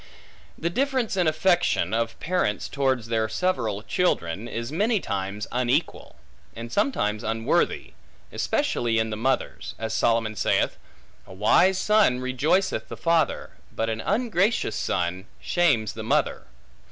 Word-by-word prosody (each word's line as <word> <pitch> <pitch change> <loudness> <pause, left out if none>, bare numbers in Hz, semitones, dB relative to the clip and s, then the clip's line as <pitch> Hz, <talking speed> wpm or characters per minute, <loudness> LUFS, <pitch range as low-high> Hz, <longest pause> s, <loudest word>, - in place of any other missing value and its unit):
The 170 +2 -2
difference 260 -1 0
in 180 -3 +2
affection, 170 - +2
of 115 0 -1
parents 160 - -1
towards 130 -4 0
their 110 -1 0
several 110 - -1
children, 105 - -1
is 115 +2 -5
many 210 +7 +1
times 100 - -3
unequal; 125 +5 -1 0.4
and 115 +1 -7
sometimes 110 - 0
unworthy; 115 +1 0 0.4
especially 115 -1 0
in 110 0 0
the - - -2
mothers; 115 - -2
as 110 0 -4
Solomon 115 -2 +1
saith, - - 0 0.5
A - - -11
wise 180 - +4
son 205 -10 +3
rejoiceth 140 +9 0
the - - -8
father, 165 -3 +1 0.2
but 115 0 -2
an 110 0 -3
ungracious 210 - +1
son 90 +2 -2
shames 140 - +1
the - - -7
mother. - - 0
120 Hz, 130 wpm, -25 LUFS, 110-180 Hz, 0.5 s, wise